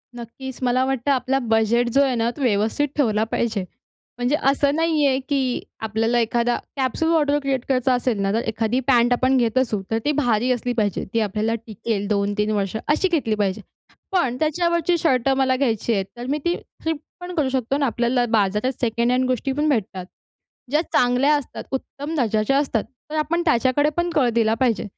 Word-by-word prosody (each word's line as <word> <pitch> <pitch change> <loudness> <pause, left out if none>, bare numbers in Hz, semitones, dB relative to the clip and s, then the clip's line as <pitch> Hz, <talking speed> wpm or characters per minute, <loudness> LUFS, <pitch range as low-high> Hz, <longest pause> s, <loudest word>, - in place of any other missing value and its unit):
नक्कीच, 245 +2 -8
मला 255 +1 +2
वाटतं, 270 +1 0
आपला 270 0 +1
बजेट 225 +2 +2
जो 275 +4 +3
आहे 265 -2 +1
ना, 230 0 +1
तो - - -7
व्यवस्थित 225 +4 +1
ठेवला 220 -6 +2
पाहिजे. 220 -4 -1 0.5
म्हणजे 245 +4 +1
असं 280 +1 +2
नाही 320 -2 +2
आहे 265 0 +2
की 265 -3 0 0.2
आपल्याला 225 +2 0
एखादा 235 +1 +1 0.2
कॅप्सूल 270 +5 0
वॉर्डरोब 295 -3 +2
क्रिएट 270 -3 -1
करायचा 255 0 +2
असेल 245 -4 0
ना, 195 - +1
तर 230 - +1
एखादी 225 +3 0
पॅन्ट 240 -1 +4
आपण 260 +2 +2
घेत 235 0 +1
असू, 230 -6 +1
तर 225 - +2
ती 295 - +3
भारी 245 -3 +2
असली 245 0 -1
पाहिजे, 205 -4 0
ती 230 - +2
आपल्याला 215 +2 0
टिकेल 205 -1 -3
2-3 205 +1 0
वर्ष, 200 -1 -1
अशी 310 +6 +2
घेतली 230 -10 +1
पाहिजे. 205 0 -1 0.5
पण 265 -10 +1
त्याच्यावरची 340 +2 +1
शर्ट 270 -6 +1
मला 260 -1 +2
घ्यायची 235 -4 0
आहेत, 195 -3 0
तर 240 - -6
मी 290 - +1
ती 345 - +2 0.3
फ्लिप 320 -2 -1 0.2
पण 355 0 -7
करू 285 -5 +1
शकतो 260 +1 -1
ना, 285 - +1
आपल्याला 240 0 +1
बाजारात 210 +3 +1
सेकंड 235 0 +1
हँड 255 +1 +2
गोष्टी 255 +1 -1
पण 295 +3 0
भेटतात, 190 -7 -1 0.7
ज्या 300 - +3
चांगल्या 250 +4 +3
असतात, 290 -4 -5
उत्तम 285 +3 -5
दर्जाच्या 225 0 +1
असतात. 265 -7 0 0.3
तर - - -3
आपण 325 +3 0
त्याच्याकडे 280 +1 +3
पण 345 0 +1
कल 265 -6 +3
दिला 225 -1 +2
पाहिजे 240 -4 +1
250 Hz, 185 wpm, -22 LUFS, 225-280 Hz, 0.7 s, पॅन्ट